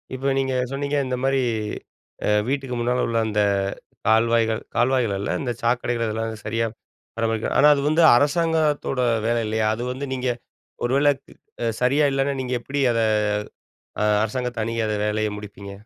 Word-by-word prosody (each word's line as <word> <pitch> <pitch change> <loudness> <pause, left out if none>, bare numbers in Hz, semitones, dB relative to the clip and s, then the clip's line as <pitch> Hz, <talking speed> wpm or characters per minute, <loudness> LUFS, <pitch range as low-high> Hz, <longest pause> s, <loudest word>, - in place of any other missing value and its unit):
இப்போ 135 +1 -3
நீங்க 135 -1 0 0.2
சொன்னீங்க. 140 +1 -2
இந்தமாரி 130 +1 0 0.9
அ - - +2 0.2
வீட்டுக்கு 135 -2 -2
முன்னால 125 +1 +1
உள்ள 115 - -1
அந்த 105 -1 +1 0.7
கால்வாய்கள், 115 0 +3
கால்வாய்கள் 120 -3 +2
அல்ல. 100 - -3
இந்த 125 - -2
சாக்கடைகள் 120 0 0
இதெல்லாம் 110 +1 -2
சரியா 115 +1 0 0.5
பராமரிக்க 115 -1 0
ஆனா 150 - +7
அது 140 - -1
வந்து 155 +2 +3
அரசாங்கத்தோட 150 -1 +1 0.3
வேலை 120 0 +2
இல்லயா! 110 0 0
அது 120 - -5
வந்து 130 +3 -4
நீங்க 130 -1 -2 0.6
ஒருவேளை 140 +4 +3 0.5
அ - - 0 0.2
சரியா 140 +4 +3
இல்லன்னா 135 +1 0
நீங்க 130 0 -3
எப்பிடி 140 +4 -3
அத 115 - 0 1.0
அ - - +2 0.2
அரசாங்கத்த 120 +1 -2
அணுகி 115 +1 -2
அத 105 - -1
வேலைய 110 0 0
முடிப்பீங்க? 100 -1 -9
125 Hz, 150 wpm, -23 LUFS, 115-135 Hz, 1.0 s, ஆனா